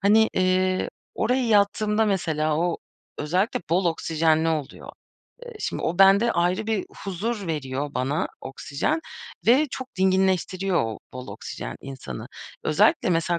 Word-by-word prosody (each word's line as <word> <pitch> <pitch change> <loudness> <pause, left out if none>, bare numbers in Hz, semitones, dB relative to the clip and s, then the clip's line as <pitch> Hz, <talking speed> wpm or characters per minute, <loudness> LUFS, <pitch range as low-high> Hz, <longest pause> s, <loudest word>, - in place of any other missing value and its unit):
Hani, 220 +2 +5
ııı, 185 0 +2 0.3
oraya 250 0 +1
yattığımda 210 +1 +3
mesela, 155 -7 0
o 175 0 +1 0.4
özellikle 180 +8 0
bol 180 +2 +3
oksijenli 160 -1 +2
oluyor. 155 -4 -3 0.5
Eee, 485 - -9
şimdi - - -3
o 175 +3 -1
bende 200 +4 +6
ayrı 180 +4 +1
bir 220 -3 0 0.2
huzur 200 +2 -3
veriyor 145 -2 -3
bana 135 +5 0
oksijen 145 - -2 0.5
ve 265 +6 +5
çok 260 -6 -7
dinginleştiriyor 190 -3 +2
o 110 -1 -4
bol 130 0 -8
oksijen - - -7
insanı. 130 - -7 0.4
Özellikle, - - +3
mesela, 170 0 +1
185 Hz, 130 wpm, -25 LUFS, 155-205 Hz, 0.5 s, bende